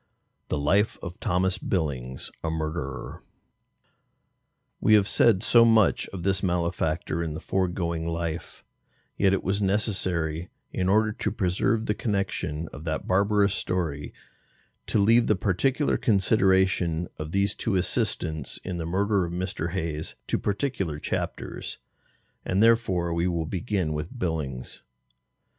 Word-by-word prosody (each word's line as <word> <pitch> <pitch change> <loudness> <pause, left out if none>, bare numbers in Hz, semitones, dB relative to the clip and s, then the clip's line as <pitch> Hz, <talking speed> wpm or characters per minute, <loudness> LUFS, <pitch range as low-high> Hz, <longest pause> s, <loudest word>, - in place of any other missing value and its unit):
The - - -1
Life 95 +9 +2
of 90 -2 -7
THOMAS 90 +1 +1
BILLINGS, 65 -8 -2
a 80 - 0
Murderer. 80 -5 -4 1.6
We 110 - +5
have 100 -2 +4
said 105 -4 +4
so 120 -1 +7
much 115 -3 +4
of 95 -3 -7
this 95 0 +1
malefactor 85 -2 -1
in 80 -2 -3
the - - -4
foregoing 85 -3 -1
life, 85 -1 -4 0.5
yet 100 -1 +3
it 95 - 0
was 100 +2 0
necessary, 95 -5 0 0.2
in 90 0 0
order 110 +2 +3
to 105 -1 -2
preserve 105 +3 0
the 105 - +1
connection 95 -7 -2
of 70 - -8
that 80 -1 -2
barbarous 100 +1 +3
story, 80 -8 -2 0.8
to - - +2
leave 115 +3 +5
the 105 - +4
particular 125 - +1
consideration 95 -5 +2
of 75 0 -5
these 100 +2 +1
two 110 -4 -1
assistants 90 - -1
in 90 -2 -4
the 80 - -3
murder 100 +2 +1
of 85 - -6
Mr. 90 -2 -3
Hayes 80 -4 -3
to - - 0
particular 100 - -1
chapters, - - -4 0.7
and 95 +4 +2
therefore 95 -7 +3
we 85 +1 +1
will 85 -3 -1
begin 95 -2 -1
with 75 +12 -5
Billings. 75 - -3
90 Hz, 135 wpm, -26 LUFS, 80-100 Hz, 1.6 s, so